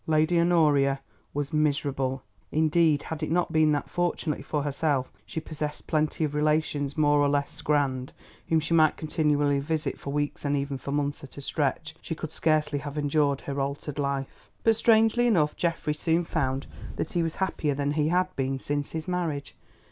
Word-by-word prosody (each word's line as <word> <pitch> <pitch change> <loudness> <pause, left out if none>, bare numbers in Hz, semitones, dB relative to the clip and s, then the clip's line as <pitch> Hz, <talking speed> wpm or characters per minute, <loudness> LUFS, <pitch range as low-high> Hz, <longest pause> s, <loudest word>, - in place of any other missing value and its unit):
Lady 155 +2 +3
Honoria 150 -5 +3 0.3
was 145 +2 -3
miserable, 140 -4 0 0.3
indeed 155 -1 +3
had 160 -1 -5
it 155 - -2
not 175 +2 +1
been 155 -1 +4
that 145 -1 0
fortunately 175 -4 -1
for 145 +1 -2
herself 140 -2 0
she - - -4
possessed 150 -2 -5
plenty 155 0 0
of 150 -1 -1
relations 150 -1 0
more 145 -1 +4
or 145 0 +3
less 140 0 -1
grand, 135 -3 0 0.4
whom 160 - +4
she 155 +2 -2
might 155 -2 +4
continually 150 -2 +1
visit 155 +2 -2
for 140 - -5
weeks 145 0 -2
and 145 0 +1
even 140 0 -2
for 140 - -5
months 145 0 -1
at 135 - -11
a - - -6
stretch, 150 +3 -1
she 165 - -4
could 160 -1 -6
scarcely 155 -3 +1
have 145 +1 -6
endured 145 -1 +1
her 140 0 -3
altered 140 +1 -4
life. 140 -1 -3
But 225 -1 +4
strangely 225 +2 +4
enough 160 -10 +2
Geoffrey 165 -3 -1
soon 165 +3 +1
found 135 -4 -1 0.3
that - - -3
he 175 - +1
was 165 -1 -1
happier 155 -6 -1
than 140 0 0
he 150 0 +1
had 180 +2 +1
been 135 0 -1
since 145 +2 -3
his 160 -1 -4
marriage. 165 -6 -2
150 Hz, 185 wpm, -27 LUFS, 140-160 Hz, 0.4 s, been